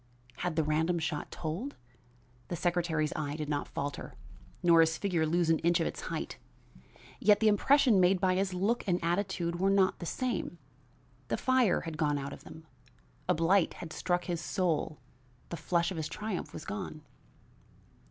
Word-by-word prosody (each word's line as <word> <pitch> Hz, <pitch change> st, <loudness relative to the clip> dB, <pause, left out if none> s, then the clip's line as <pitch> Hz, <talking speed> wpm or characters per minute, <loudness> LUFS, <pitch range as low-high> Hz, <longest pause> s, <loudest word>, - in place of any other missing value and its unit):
Had 175 Hz, -2 st, -2 dB
the 160 Hz, -, +2 dB
random 160 Hz, +3 st, +1 dB
shot 160 Hz, -2 st, -3 dB
told? 175 Hz, -, -4 dB, 0.7 s
The 175 Hz, -, -3 dB
secretary's 170 Hz, -3 st, 0 dB
eye 145 Hz, -1 st, -2 dB
did 150 Hz, -1 st, -4 dB
not 145 Hz, -1 st, -1 dB
falter, 145 Hz, 0 st, -5 dB, 0.5 s
nor 170 Hz, -1 st, +6 dB
his 160 Hz, 0 st, +2 dB
figure 175 Hz, -6 st, 0 dB
lose 170 Hz, +1 st, +2 dB
an 160 Hz, -, +3 dB
inch 170 Hz, +1 st, +2 dB
of 165 Hz, -, +1 dB
its -, -, -4 dB
height, -, -, -5 dB, 0.8 s
yet 210 Hz, 0 st, +5 dB
the 220 Hz, -, +3 dB
impression 240 Hz, +1 st, +5 dB
made 185 Hz, +1 st, +4 dB
by 185 Hz, -1 st, +3 dB
his 190 Hz, +1 st, 0 dB
look 200 Hz, +6 st, 0 dB
and 175 Hz, -2 st, +3 dB
attitude 175 Hz, -1 st, -1 dB
were 195 Hz, +1 st, +3 dB
not 195 Hz, -1 st, +3 dB
the 170 Hz, -, -5 dB
same; 245 Hz, -7 st, -2 dB, 0.7 s
the -, -, -1 dB
fire 255 Hz, -7 st, +3 dB
had 160 Hz, -2 st, -6 dB
gone 150 Hz, -2 st, +2 dB
out 140 Hz, 0 st, -5 dB
of -, -, -11 dB
them; 160 Hz, -, -12 dB, 0.6 s
a -, -, +4 dB
blight 165 Hz, +3 st, +3 dB
had 160 Hz, -2 st, -8 dB
struck 175 Hz, -1 st, -1 dB
his 170 Hz, -2 st, -2 dB
soul 170 Hz, -5 st, -1 dB, 0.5 s
the -, -, -4 dB
flush 170 Hz, +2 st, 0 dB
of 185 Hz, -, -5 dB
his 155 Hz, -1 st, -2 dB
triumph 210 Hz, -4 st, -4 dB
was -, -, -8 dB
gone. 190 Hz, -6 st, -5 dB
175 Hz, 175 wpm, -31 LUFS, 160-190 Hz, 0.8 s, nor